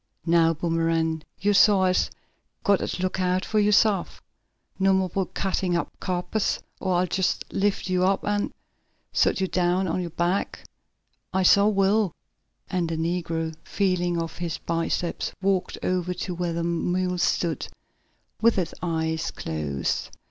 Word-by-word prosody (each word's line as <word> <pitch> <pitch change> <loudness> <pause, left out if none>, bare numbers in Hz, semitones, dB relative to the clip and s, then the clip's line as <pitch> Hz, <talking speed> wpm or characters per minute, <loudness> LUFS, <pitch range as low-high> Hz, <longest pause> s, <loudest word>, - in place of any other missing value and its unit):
Now, 165 -1 +4
Boomerang, 165 -1 0 0.2
yo' 205 +4 +2
suah 200 -1 +5
has 185 0 +2 0.5
got 200 -2 +4
t' 185 - -3
look 185 0 -1
out 185 0 +1
fo' 215 - +1
yo' 210 0 +3
sef. 205 -2 +2 0.6
No 195 0 +4
mo' 190 0 +2
ob 180 - -9
yo' 195 -1 +1
cuttin' 185 -2 -1
up 170 - -1
capers, 185 +3 -1 0.2
or 185 -2 0
I'll 180 +1 +3
jest 185 +1 0
lift 200 0 0
you 185 -1 +1
up, 190 +1 +1
an' 205 0 0 0.6
sot - - +3
yo' 190 - +2
down 180 +1 +1
on 180 +2 -1
yo' 175 - -4
back, 175 +4 -1 0.7
I 190 0 +1
suah 200 +3 +6
will," 200 -1 +2 0.5
and 180 -3 -1
the 165 - -2
negro 165 -1 -2
feeling 180 -3 0
of 165 0 -5
his 170 -2 -2
biceps 165 +1 -2
walked 195 -1 0
over 180 0 0
to 180 - -4
where 175 -1 -2
the 170 0 -2
mule 180 +2 0
stood, 170 -3 0 0.7
with 230 -1 +4
its 180 -3 -1
eyes 160 -1 -1
closed. 75 -4 -3
180 Hz, 155 wpm, -25 LUFS, 170-190 Hz, 0.7 s, suah